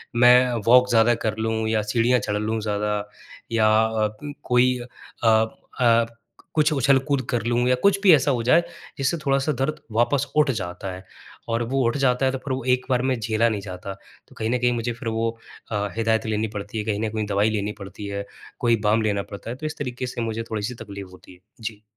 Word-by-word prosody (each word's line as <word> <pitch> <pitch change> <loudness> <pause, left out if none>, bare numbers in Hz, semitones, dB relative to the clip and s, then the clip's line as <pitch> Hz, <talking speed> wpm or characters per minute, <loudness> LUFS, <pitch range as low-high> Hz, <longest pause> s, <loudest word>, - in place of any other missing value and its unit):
मैं 125 +1 +6
वॉक 125 +1 +6
ज़्यादा 115 +1 +4
कर 110 0 0
लूँ 110 0 -1
या 110 -1 +2
सीढ़ियाँ 115 +3 +2
चढ़ 105 0 -2
लूँ 110 +1 -1
ज़्यादा, 105 0 -1 0.5
या 110 -1 +3 0.2
अ 110 -1 0
अं 145 -1 -6
कोई 125 +1 +3 0.5
अ - - +3 0.5
अ, 115 -1 +5 0.5
कुछ 155 0 +3
उछल-कूद 135 0 +2
कर 120 -2 0
लूँ 120 +1 +1
या 125 - +4
कुछ 200 0 +4
भी 185 -4 +8
ऐसा 145 - +1
हो 120 -3 -1
जाए, 170 +8 +4 0.4
जिससे 135 +5 +1
थोड़ा-सा 135 +2 +2
दर्द 155 +3 -1
वापस 135 +5 +2
उठ 150 -2 +4
जाता 95 -3 -5
है 95 - -11 0.5
और 115 +1 0
वो 135 -1 +1
उठ 120 - 0
जाता 135 -1 +2
है, 130 - +2
तो 135 - -3
फिर 130 0 -4
वो 130 - -3
एक 130 - -11
बार 125 -1 +3
में 130 -3 0
झेला 115 +1 +1
नहीं 105 -2 -3
जाता। 95 0 -7 0.3
तो - - -19
कहीं 110 0 -2
न 125 - +2
कहीं 125 0 +2
मुझे 120 0 -2
फिर 115 0 -5
वो 115 +1 0 0.4
अ, 105 -1 -1
हिदायत 110 0 +1
लेनी 110 0 0
पड़ती 100 +2 -5
है, 105 - -1
कहीं 105 -2 -1
न - - -1
कहीं 110 -1 -2
दवाई 100 +2 +2
लेनी 105 -1 -1
पड़ती 100 +1 -8
है, 100 0 -4 0.3
कोई 120 -1 +3
बाम 110 +2 +3
लेना 100 -2 0
पड़ता 100 +2 -9
है, 120 - -4
तो 155 +4 -8
इस 155 +1 -4
तरीके 125 -2 -4
से 120 - -5
मुझे 115 0 -2
थोड़ी-सी 110 +3 -2
तकलीफ़ 100 -2 -8
होती 90 0 -15
है। 90 - -19 0.2
जी। 110 -1 -6
115 Hz, 220 wpm, -23 LUFS, 105-125 Hz, 0.5 s, भी